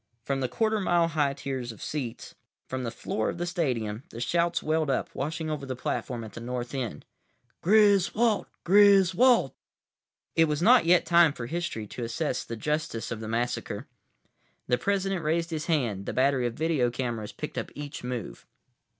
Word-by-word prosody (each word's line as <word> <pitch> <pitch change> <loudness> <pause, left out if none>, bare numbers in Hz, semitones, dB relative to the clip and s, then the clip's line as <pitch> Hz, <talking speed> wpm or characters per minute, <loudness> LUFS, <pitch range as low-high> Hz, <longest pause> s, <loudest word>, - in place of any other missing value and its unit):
From 135 +3 -1
the 130 - 0
quarter 220 - +1
mile 175 -3 +2
high 145 -3 +1
tiers 130 -4 -4
of 110 - -13
seats, 130 -7 -5 0.3
from 130 0 -3
the 120 - -2
floor 110 -1 -2
of - - -4
the 175 - -2
stadium, 125 - -1
the 115 - -9
shouts 170 +7 +1
welled 155 -1 +1
up, 135 - -1
washing 160 +3 -3
over 150 -2 -3
the 130 -1 -4
platform 125 -1 -3
at 110 - -9
the 115 - -8
North 120 +1 -4
end. 120 - -4 0.6
"Griswold! 210 +2 +4 0.2
Griswold!" 200 +5 +5 0.8
It 165 - +5
was 150 -2 -1
not 230 -1 +5
yet 175 +1 +5
time 170 -3 +5
for 120 - -6
history 160 -7 -3
to 120 +4 -7
assess 125 +4 -2
the 115 - -6
justice 150 -2 -2
of 115 - -3
the 110 - -6
massacre. 120 +2 -2 0.8
The 125 0 +1
President 195 -3 0
raised 165 +2 0
his 155 -1 -3
hand. 120 - 0
The - - -2
battery 130 -1 +2
of 115 - -5
video 155 -5 +1
cameras 120 -4 -3
picked - - -5
up - - -5
each 145 -2 -7
move. 125 -5 -5
145 Hz, 175 wpm, -27 LUFS, 120-170 Hz, 0.8 s, Griswold